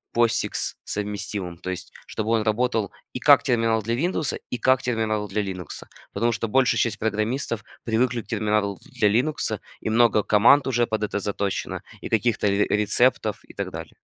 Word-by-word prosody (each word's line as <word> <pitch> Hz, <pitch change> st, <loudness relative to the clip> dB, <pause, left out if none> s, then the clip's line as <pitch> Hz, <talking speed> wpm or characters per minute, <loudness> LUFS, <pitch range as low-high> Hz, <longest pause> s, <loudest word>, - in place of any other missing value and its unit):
Posix-совместимым. 105 Hz, -5 st, -2 dB
То 95 Hz, +1 st, -7 dB
есть 90 Hz, 0 st, -7 dB, 0.2 s
чтобы 110 Hz, 0 st, -3 dB
он 115 Hz, -2 st, +2 dB
работал 110 Hz, -1 st, 0 dB, 0.2 s
и -, -, -4 dB
как -, -, +6 dB
терминал 115 Hz, -2 st, +2 dB
для 115 Hz, +3 st, -1 dB
"Виндоуса", 160 Hz, +1 st, -1 dB
и 125 Hz, -, -2 dB
как 130 Hz, +2 st, +3 dB
терминал 110 Hz, -4 st, -1 dB
для 105 Hz, +2 st, -1 dB
"Линукса". 95 Hz, -5 st, -7 dB, 0.2 s
Потому 120 Hz, 0 st, +1 dB
что 115 Hz, 0 st, -2 dB
большая 130 Hz, +3 st, +3 dB
часть 115 Hz, -2 st, 0 dB
программистов 110 Hz, +1 st, -1 dB, 0.2 s
привыкли 120 Hz, +1 st, +1 dB
к -, -, -22 dB
терминалу 105 Hz, -3 st, 0 dB, 0.2 s
для 105 Hz, -, +5 dB
"Линукса" 125 Hz, +9 st, 0 dB, 0.2 s
и -, -, -2 dB
много 110 Hz, -2 st, +4 dB
команд 115 Hz, +9 st, +5 dB
уже 120 Hz, -2 st, +2 dB
под 110 Hz, -1 st, -2 dB
это 105 Hz, -1 st, -1 dB
заточено 100 Hz, 0 st, -3 dB, 0.2 s
и -, -, -5 dB
каких-то 110 Hz, -1 st, +1 dB
ре 100 Hz, +1 st, +2 dB
рецептов 105 Hz, +5 st, +2 dB
и -, -, -16 dB
так -, -, -4 dB
далее. -, -, -8 dB
110 Hz, 170 wpm, -24 LUFS, 105-120 Hz, 0.2 s, как